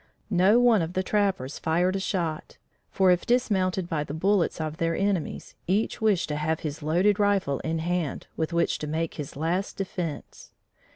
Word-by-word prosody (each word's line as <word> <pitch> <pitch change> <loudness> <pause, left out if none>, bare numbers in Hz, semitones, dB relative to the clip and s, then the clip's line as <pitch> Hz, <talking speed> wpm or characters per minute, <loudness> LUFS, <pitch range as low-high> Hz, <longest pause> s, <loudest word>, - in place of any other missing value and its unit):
No 195 +5 +5
one 240 -5 +5
of 165 +2 -3
the 185 - 0
trappers 190 -10 0
fired 175 +4 +1
a - - 0
shot, 170 -5 -3 0.3
for 190 -1 +3
if 180 -1 +2
dismounted 190 -7 +1
by 160 -4 -1
the 150 - -6
bullets 190 +1 +1
of 155 0 -3
their 165 0 0
enemies, 195 -4 -2
each 200 +6 0
wished 210 -5 +2
to 150 - -2
have 155 +1 -1
his 150 -1 -5
loaded 180 +7 +2
rifle 200 -9 +2
in 160 0 -2
hand, 170 -2 -2
with 160 +1 -2
which 170 0 +1
to 150 - -4
make 160 +2 -2
his 145 -2 -7
last 170 +7 -2
defense. 180 -5 -5
175 Hz, 180 wpm, -26 LUFS, 160-195 Hz, 0.3 s, No